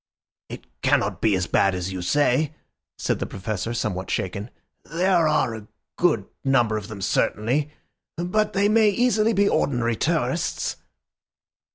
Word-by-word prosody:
"It - - -9 0.2
cannot - - +1
be 110 -3 +3
as 95 -1 0
bad 100 +1 +2
as 90 +1 -4
you 95 - -4
say," 145 - +1 0.4
said - - -1
the - - -3
Professor, 105 +2 -4
somewhat 105 -6 -3
shaken. 100 +4 -3 0.3
"There 175 0 +2
are 135 -6 +1
a 110 -1 -9 0.3
good - - +2 0.2
number 120 -5 +2
of 105 -2 -4
them 105 -3 -7
certainly, 130 +10 0 0.5
but 185 +5 0
they 200 +1 +3
may 215 0 +4
easily 225 0 +2
be 200 0 +3
ordinary 120 - +1
tourists." - - -1
120 Hz, 145 wpm, -24 LUFS, -, 0.5 s, may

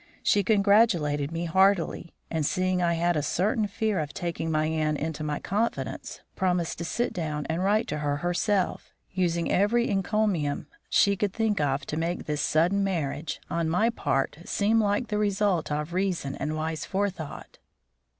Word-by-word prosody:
She 205 - +3
congratulated 195 -9 +3
me 165 +1 -2
heartily, 190 -1 +2 0.2
and, 160 -2 0
seeing 185 +4 +1
I 170 -1 +2
had 175 +1 +1
a 150 - +1
certain 205 +8 0
fear 215 -1 -1
of 150 -2 -4
taking 170 -2 -3
my 155 -1 +1
aunt 155 -1 0
into 155 0 -3
my 150 -1 -1
confidence, 220 +4 -3
promised 180 -4 0
to 170 - -3
sit 240 +8 -1
down 150 -4 -3
and 170 +3 -1
write 210 +3 +2
to 150 - -2
her 145 -1 0
herself, 180 +4 0 0.2
using 170 -3 0
every 235 +5 +3
encomium 195 -7 0 0.2
she 200 0 +4
could 200 0 -1
think 220 -5 0
of 140 -1 0
to 150 - -4
make 170 +2 -2
this 150 -1 -1
sudden 175 +8 +2
marriage, 155 -5 -2
on 170 -2 -1
my 215 +8 +2
part, 140 -8 -1
seem 215 +4 +2
like 205 +3 0
the 210 -1 0
result 200 -5 +1
of 150 +3 -2
reason 180 -7 -1
and 155 +2 -3
wise 160 0 -3
forethought. 190 -6 -4
175 Hz, 170 wpm, -27 LUFS, 155-200 Hz, 0.2 s, she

